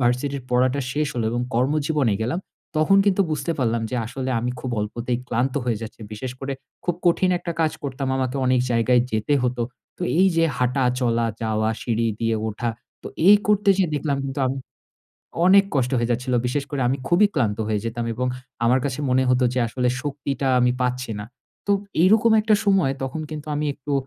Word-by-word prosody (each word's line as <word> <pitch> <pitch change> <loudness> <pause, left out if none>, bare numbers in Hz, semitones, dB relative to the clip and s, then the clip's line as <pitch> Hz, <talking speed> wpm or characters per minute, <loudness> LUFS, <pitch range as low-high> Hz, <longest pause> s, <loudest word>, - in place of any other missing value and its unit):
ভার্সিটির 130 +3 0
পড়াটা 130 +2 +2
শেষ 150 +2 0
হলো 120 -2 -1
এবং 120 - -1
কর্মজীবনে 140 -1 +1
গেলাম 125 +10 -1 0.4
তখন 155 +6 +4
কিন্তু 200 -1 +3
বুঝতে 155 +2 -1
পারলাম 115 -3 0
যে 125 - -2
আসলে 130 +2 -4
আমি 120 +1 -1
খুব 130 - -4
অল্পতেই 120 +3 -2
ক্লান্ত 125 +2 0
হয়ে 120 -4 0
যাচ্ছি, 110 0 -9
বিশেষ 120 +4 -5
করে 135 0 -3 0.3
খুব 175 - 0
কঠিন 180 +2 +3
একটা 170 - -4
কাজ 155 -2 +2
করতাম 135 -1 -3
আমাকে 130 0 -1
অনেক 125 -1 +3
জায়গায় 120 +1 +3
যেতে 110 +6 +1
হতো, 125 -1 0 0.3
তো - - -7 0.2
এই 190 - +6
যে 165 - +4
হাঁটা, 125 +1 +1 0.2
চলা, 120 -2 +1 0.2
যাওয়া 110 0 0
সিঁড়ি 115 -1 0
দিয়ে 115 -1 +1
ওঠা, 110 +2 -3 0.3
তো - - -8 0.2
এই 205 - +10
করতে 210 0 +2
যেয়ে 185 -4 +1
দেখলাম 145 -1 -1
কিন্তু 135 +1 -4
আমি 135 +1 -2 0.9
অনেক 195 +1 +7
কষ্ট 125 -2 +1
হয়ে 120 0 0
যাচ্ছিল। 125 +2 0
বিশেষ 140 +3 -1
করে 145 -2 -2
আমি 135 - +1
খুবই 175 +5 +5
ক্লান্ত 115 -8 0
হয়ে 105 -1 0
যেতাম 115 +1 -3
এবং 125 +3 -1 0.4
আমার 125 +3 +4
কাছে 140 -1 -2
মনে 130 +1 +3
হত 125 0 +3
যে - - 0
আসলে 125 +2 -1
শক্তিটা 140 -1 -2
আমি 125 0 +4
পাচ্ছি 125 0 -1
না। - - -5 0.4
তো 205 - +3 0.3
এইরকম 220 +4 +5
একটা 215 0 +3
সময় 195 -9 +3
তখন 135 +4 -3
কিন্তু 155 -1 -6
আমি 150 +1 -1
একটু 145 0 -6
130 Hz, 190 wpm, -23 LUFS, 120-150 Hz, 0.9 s, এই